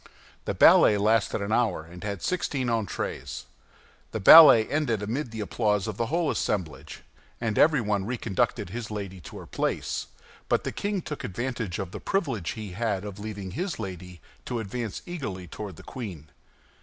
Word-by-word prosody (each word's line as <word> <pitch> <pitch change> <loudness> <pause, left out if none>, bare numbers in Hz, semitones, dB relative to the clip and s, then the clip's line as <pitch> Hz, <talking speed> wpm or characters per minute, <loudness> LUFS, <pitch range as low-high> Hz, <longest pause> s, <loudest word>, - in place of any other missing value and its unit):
The - - -2
ballet 105 - +7
lasted 105 0 +2
an 100 - -4
hour, 115 -8 +1
and 90 +1 -12
had 100 -3 -4
sixteen 140 -8 -1
entrées. 110 -4 -3 0.7
The 110 - -2
ballet 115 -1 +10
ended 120 -9 0
amid 120 +6 -3
the 110 -1 -6
applause 105 -1 0
of 105 -2 -4
the 115 - -1
whole 165 +2 +1
assemblage, 80 -8 -3 0.4
and 115 -3 -1
everyone 105 -11 +3
reconducted 115 -7 -1
his 115 0 -5
lady 100 -3 -6
to - - -10
her - - -9
place; - - -2 0.4
but - - +2
the - - -3
king 200 -3 -2
took 150 - -6
advantage 115 -3 -3
of 95 -2 -5
the - - -6
privilege 135 - -1
he 105 -4 -7
had 100 0 -2
of 105 -1 -7
leaving 100 -3 -6
his 180 - -3
lady, 90 -5 -7 0.2
to 120 -2 -3
advance 110 0 -5
eagerly 130 - -5
toward 95 +2 -7
the - - -13
queen. 90 - -8
110 Hz, 170 wpm, -27 LUFS, 95-120 Hz, 0.7 s, ballet